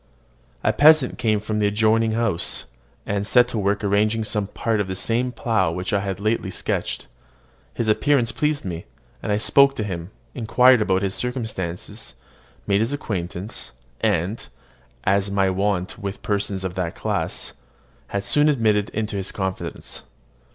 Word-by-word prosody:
A - - +3
peasant 150 -3 +5
came 110 -2 +2
from 105 +1 -3
an - - 0
adjoining 110 +2 +2
house, 110 -7 0 0.4
and 100 0 -1
set 125 +1 +5
to 115 - -2
work 100 +1 0
arranging 105 +2 +2
some 105 -2 -2
part 110 +1 -1
of 100 - 0
the 95 - -3
same 120 +6 0
plough 110 -7 +1
which 90 +3 -3
I 100 - +3
had 95 -1 -3
lately 110 -2 0
sketched. - - -2 0.7
His 115 - -1
appearance 120 +2 +3
pleased 150 -4 -1
me; 85 -2 -5 0.4
and 105 - -2
I 105 - +3
spoke 140 +5 +5
to 110 - -2
him, 90 -4 -5 0.2
inquired 125 +1 +4
about 95 -2 +1
his 95 -1 0
circumstances, 110 - -4 0.5
made 100 0 +2
his 115 +5 0
acquaintance, 95 - -4 0.3
and, 95 +8 0 0.6
as 100 +1 +2
is - - -6
my 95 -1 +3
wont 95 -1 -1
with 100 0 -5
persons 100 -2 -1
of 95 -2 -3
that 90 -2 -3
class, - - -2 0.6
was 100 0 -2
soon 150 +1 +4
admitted 110 -7 +2
into 105 -1 -3
his 95 0 -4
confidence. 95 -1 -5
105 Hz, 160 wpm, -23 LUFS, 95-115 Hz, 0.7 s, peasant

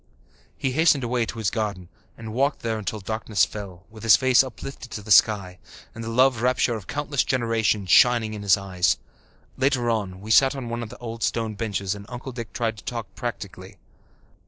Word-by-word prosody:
He 135 - -1
hastened 150 -1 +3
away 120 -1 0
to 115 - -6
his 110 -4 -1
garden 100 -6 -3 0.3
and 110 -1 -8
walked 140 +4 0
there 110 -1 -2
until 105 0 -4
darkness 110 -1 0
fell, 95 -4 -9
with 110 -1 -12
his 115 -2 +7
face 130 0 +4
uplifted 130 0 -8
to 105 - -7
the 105 - -7
sky, 95 -4 +4 0.3
and 115 - -7
the 115 - -5
love 125 0 +3
rapture 125 -1 +2
of 105 -5 -6
countless 145 -2 -1
generations 115 -5 0
shining 120 -3 +5
in 105 - -6
his 100 0 +4
eyes. 90 -3 0 0.6
Later 130 -3 +1
on, 100 -4 -3
we 105 +3 -6
sat 135 +4 +5
on 130 -4 -5
one 120 +1 -3
of 115 - -6
the 125 - -11
old 115 -1 -7
stone 115 -1 -1
benches 100 -3 -2
and 100 0 -10
Uncle 125 +1 -7
Dick 115 -2 -7
tried 115 -2 -2
to - - -12
talk 115 -3 -5
practically. 100 -5 -7
115 Hz, 200 wpm, -24 LUFS, 105-125 Hz, 0.6 s, his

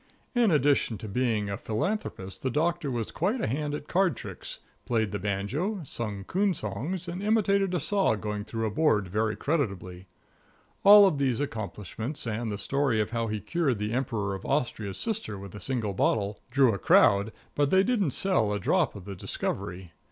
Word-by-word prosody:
In 240 -3 +4
addition 145 - +2
to 110 - -8
being 110 -1 0
a 100 0 -3
philanthropist 110 - -3
the 130 - 0
Doctor 160 +2 0
was 120 -4 -3
quite 205 +10 0
a - - 0
hand 145 +4 -2
at 150 - -7
card 185 -7 +2
tricks, - - -7 0.3
played 110 -4 0
the 105 - -3
banjo, 105 - -2
sung 105 -7 -4
coon 190 - +1
songs 140 - -4
and 175 +2 -4
imitated 200 -3 +2
a - - +1
saw 195 - +2
going 105 0 -4
through 115 +1 -3
a 110 - -1
board 110 -9 +2
very 110 +2 0
creditably. 100 - -2 0.8
All 200 -1 +9
these 135 -5 0
accomplishments, 110 - -5
and 115 0 -2
the 100 - -3
story 135 +1 +1
of 105 +1 -1
how 115 -1 -1
he 110 0 -2
cured 150 -3 0
the 105 +2 -2
Emperor 115 -6 -1
of 95 - -6
Austria's 115 -8 -1
sister 220 - -2
with 100 -1 -9
a 105 - -7
single 110 -1 -1
bottle, 100 +1 0
drew 135 -4 +4
a 100 - -3
crowd, 100 +4 +5 0.2
but 145 -1 +2
they 190 +3 +5
didn't 210 -7 +1
sell 130 - +1
a 105 - -1
drop 155 - +1
of 100 -3 -9
the 100 - -6
Discovery. 95 -1 -4
120 Hz, 185 wpm, -28 LUFS, 105-165 Hz, 0.8 s, All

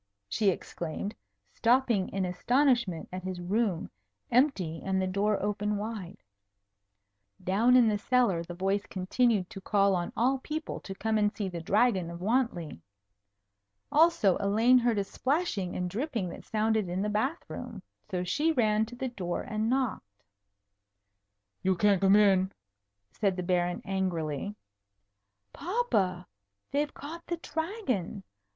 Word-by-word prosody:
she 205 - +2
exclaimed, 175 +2 -4 0.4
stopping 235 -5 +2
in 195 -1 -1
astonishment 235 - +1
at 185 - -4
his 185 -1 -5
room, 190 0 0 0.4
empty 210 - +2
and 190 0 0
the 190 - +1
door 200 +2 +1
open 210 0 -1
wide. 205 -3 -6 1.2
Down 225 +7 +4
in 245 -2 +6
the 210 -1 +1
cellar 240 -7 +2
the 175 +1 -8
voice 195 +3 -1
continued 195 +1 +1
to 195 - -8
call 200 0 +3
on 175 -1 -2
all 260 +3 +2
people 310 +4 -4
to 195 - -8
come 220 +1 0
and 210 -1 +2
see 200 -3 -3
the 170 -2 -5
Dragon 195 -1 +2
of 170 0 -7
Wantley. 190 - -1 1.1
Also 305 - +4
Elaine 225 +6 +4
heard 235 -2 +1
a 200 - +2
splashing 255 - -1
and 180 - -1
dripping 225 - -2
that - - -10
sounded 215 -3 0
in 185 +3 -1
the - - 0
bath 220 +10 -1
room. - - -7 0.3
So 180 -3 -1
she 295 - +1
ran 220 -5 +2
to 245 - -10
the 260 +1 -3
door 180 -7 -3
and 215 +1 -2
knocked. 245 - -1 1.4
"You 190 0 +2
can't 200 -1 +3
come 195 0 +6
in!" 195 -2 +4 0.6
said 195 -3 0
the 180 - -2
Baron 175 0 0
angrily. 185 -2 -2 1.0
"Papa! 205 - 0 0.5
They've 290 +1 0
caught 330 +4 -9
the 345 - -2
Dragon. 320 - -3
205 Hz, 145 wpm, -29 LUFS, 185-245 Hz, 1.4 s, in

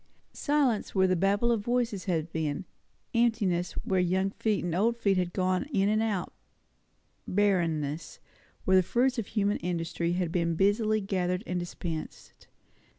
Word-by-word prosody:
Silence, 280 -9 0
where 190 -1 +4
the 185 0 +2
babble 200 +6 +2
of 230 -3 +1
voices 235 -3 -1
had 165 -3 -1
been; 160 +2 -2 0.5
emptiness, 215 -7 +1
where 190 -1 +1
young 190 +2 +1
feet 215 0 -1
and 175 -2 -2
old 225 +6 +2
feet 200 -4 +2
had 180 -1 0
gone 185 +4 0
in 195 -6 +2
and 215 +1 +2
out; 205 -5 -2 0.9
barrenness, 165 -6 0 0.5
where 190 0 +5
the - - +6
fruits 245 +6 +1
of 220 - -3
human 205 -1 0
industry 170 0 -2
had 175 -2 -1
been 170 -1 0
busily 215 +4 +2
gathered 180 -1 -1
and 180 0 -2
dispensed. 170 -2 -7
190 Hz, 155 wpm, -29 LUFS, 175-215 Hz, 0.9 s, the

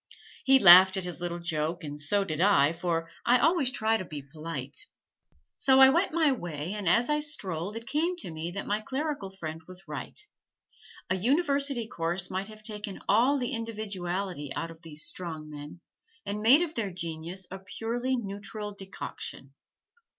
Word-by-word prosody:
He 270 0 +7
laughed 190 -3 +9
at 190 - -1
his 180 -1 -5
little 175 -1 -3
joke 165 0 -2
and 145 -1 -5
so 200 +7 +2
did 160 -4 -3
I, 165 -7 +5
for 165 -1 -2
I 245 +1 +5
always 315 -2 +3
try 225 -3 +1
to 195 - -5
be 150 -5 -7
polite. 165 - -5 0.7
So 265 -1 +5
I 265 0 +10
went 345 +6 +2
my 315 -2 +3
way, 175 - -4
and 205 -5 0
as 235 +7 +4
I 300 0 +2
strolled 200 - -3
it 230 0 -6
came 320 +7 0
to 255 - -5
me 160 +1 -4
that 195 +3 -5
my 210 +1 -1
clerical 270 -3 -3
friend 160 -4 -7
was 185 +1 -9
right - - -6 0.9
a - - +3
university 280 - +1
course 175 0 -2
might 190 +1 -2
have 215 0 -13
taken 210 -2 -4
all 245 +8 +4
the 245 -3 -2
individuality 195 -8 -4
out 165 0 -3
of 165 0 -15
these 155 -2 -5
strong 160 -4 -6
men 150 +3 -9 0.4
and 205 +1 -3
made 265 +10 +7
of 330 -2 -4
their 220 -7 -2
genius 170 +1 -5
a 190 - -6
purely 230 +7 -2
neutral 205 0 -5
decoction. 190 -8 -7
195 Hz, 175 wpm, -28 LUFS, 170-240 Hz, 0.9 s, I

